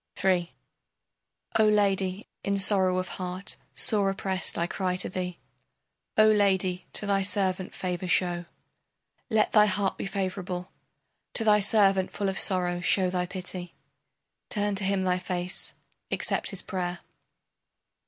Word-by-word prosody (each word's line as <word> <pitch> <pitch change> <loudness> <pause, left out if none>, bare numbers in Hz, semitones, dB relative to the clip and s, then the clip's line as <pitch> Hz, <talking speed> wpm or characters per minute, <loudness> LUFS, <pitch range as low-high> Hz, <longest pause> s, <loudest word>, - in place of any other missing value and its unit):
III 180 -2 +2 1.1
O 215 - +6
lady, 200 -2 +1 0.2
in 200 0 0
sorrow 190 -2 +4
of 185 0 -1
heart 185 +2 -3 0.2
sore 205 -3 +1
oppressed 190 -1 -2
I 170 - +1
cry 185 +1 -1
to 180 - -1
thee. 180 -1 -4 0.8
O 215 - +7
lady, 190 -4 +2
to - - -1
thy 200 -1 +2
servant 190 -2 0
favor 180 0 -3
show. 175 -1 +1 0.8
Let 220 -2 +2
thy 210 -1 +6
heart 200 -1 0
be - - -2
favorable, 185 -2 -3 0.6
To 225 - +4
thy 210 -1 +5
servant 195 -2 +3
full 200 -1 -1
of 190 - -3
sorrow 180 -2 +1
show 185 +1 +2
thy 180 -1 -1
pity, 180 -1 -7 0.7
Turn 205 -1 0
to 195 0 0
him 195 -1 +1
thy 180 -1 +1
face, 180 0 -4 0.3
accept - - 0
his 195 - -3
prayer. 180 -1 -3
190 Hz, 140 wpm, -27 LUFS, 180-200 Hz, 1.1 s, O